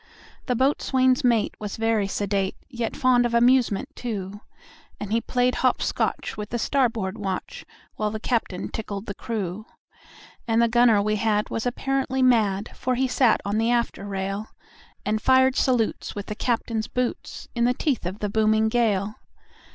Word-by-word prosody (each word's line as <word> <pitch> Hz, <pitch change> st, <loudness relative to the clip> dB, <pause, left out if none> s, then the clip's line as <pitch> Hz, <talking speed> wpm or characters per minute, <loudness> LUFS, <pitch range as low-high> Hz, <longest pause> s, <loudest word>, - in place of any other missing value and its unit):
The 250 Hz, -, +1 dB
boatswain's 260 Hz, 0 st, +2 dB
mate 235 Hz, -4 st, +2 dB
was 210 Hz, -2 st, -5 dB
very 225 Hz, -2 st, +1 dB
sedate, 195 Hz, -1 st, -1 dB
Yet 235 Hz, -4 st, -4 dB
fond 255 Hz, -1 st, +3 dB
of 240 Hz, -1 st, 0 dB
amusement, 245 Hz, 0 st, +3 dB
too; 205 Hz, -4 st, -5 dB, 0.6 s
And 205 Hz, -, -6 dB
he 230 Hz, +1 st, +2 dB
played 250 Hz, +1 st, +1 dB
hop 255 Hz, -1 st, +3 dB
scotch -, -, -1 dB
with 210 Hz, -1 st, -6 dB
the 240 Hz, -, -2 dB
starboard 230 Hz, -5 st, 0 dB
watch, 190 Hz, -2 st, -4 dB, 0.3 s
While 215 Hz, -1 st, 0 dB
the 215 Hz, +1 st, -5 dB
captain 220 Hz, -6 st, -2 dB
tickled 205 Hz, -2 st, -5 dB
the 200 Hz, -, -5 dB
crew. 210 Hz, -2 st, -4 dB, 0.8 s
And 225 Hz, 0 st, +2 dB
the 235 Hz, -, +5 dB
gunner 230 Hz, -3 st, +4 dB
we 215 Hz, +1 st, 0 dB
had 210 Hz, 0 st, 0 dB
was 225 Hz, +2 st, -2 dB
apparently 265 Hz, +1 st, -1 dB
mad, 215 Hz, -5 st, +2 dB
For 255 Hz, 0 st, -1 dB
he 260 Hz, +2 st, +1 dB
sat 250 Hz, -1 st, +3 dB
on 205 Hz, +2 st, 0 dB
the 225 Hz, +1 st, +1 dB
after 240 Hz, -4 st, 0 dB
rail, 195 Hz, +2 st, -3 dB, 0.6 s
And 215 Hz, +1 st, 0 dB
fired 260 Hz, 0 st, +4 dB
salutes 245 Hz, -6 st, 0 dB
with 205 Hz, 0 st, -5 dB
the -, -, -4 dB
captain's 230 Hz, -1 st, -1 dB
boots, 250 Hz, 0 st, -3 dB
In 235 Hz, -1 st, +1 dB
the 250 Hz, +1 st, +2 dB
teeth 260 Hz, -, -1 dB
of 185 Hz, +3 st, -5 dB
the 210 Hz, -1 st, -3 dB
booming 220 Hz, +1 st, +2 dB
gale. 215 Hz, -3 st, 0 dB
225 Hz, 165 wpm, -24 LUFS, 210-245 Hz, 0.8 s, the